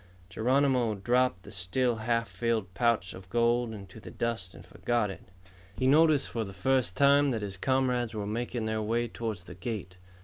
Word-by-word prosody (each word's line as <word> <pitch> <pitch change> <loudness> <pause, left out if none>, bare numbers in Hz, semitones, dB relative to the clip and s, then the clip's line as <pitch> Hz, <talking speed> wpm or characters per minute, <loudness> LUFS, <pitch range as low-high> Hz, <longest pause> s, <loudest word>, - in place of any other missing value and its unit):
Geronimo 125 -2 +2
dropped 120 -2 +1
the 100 - -11
still 110 +6 0
half 115 +1 0
filled 110 -6 -2
pouch 110 -1 +1
of 95 0 -12
gold 120 +1 +2
into 100 -1 -10
the - - -10
dust 115 -6 -3
and - - -13
forgot 120 -4 -1
it. - - -10 0.6
He 130 - 0
noticed 150 +1 +4
for 115 - -2
the 95 -2 -8
first 120 0 +1
time 140 0 +5
that 115 -5 -2
his 100 -2 -4
comrades 125 0 0
were 105 -1 -3
making 115 +2 -3
their 110 0 -1
way 115 +3 0
toward 115 -2 -4
the 90 0 -11
gate. 95 -1 -6
115 Hz, 180 wpm, -29 LUFS, 100-125 Hz, 0.6 s, time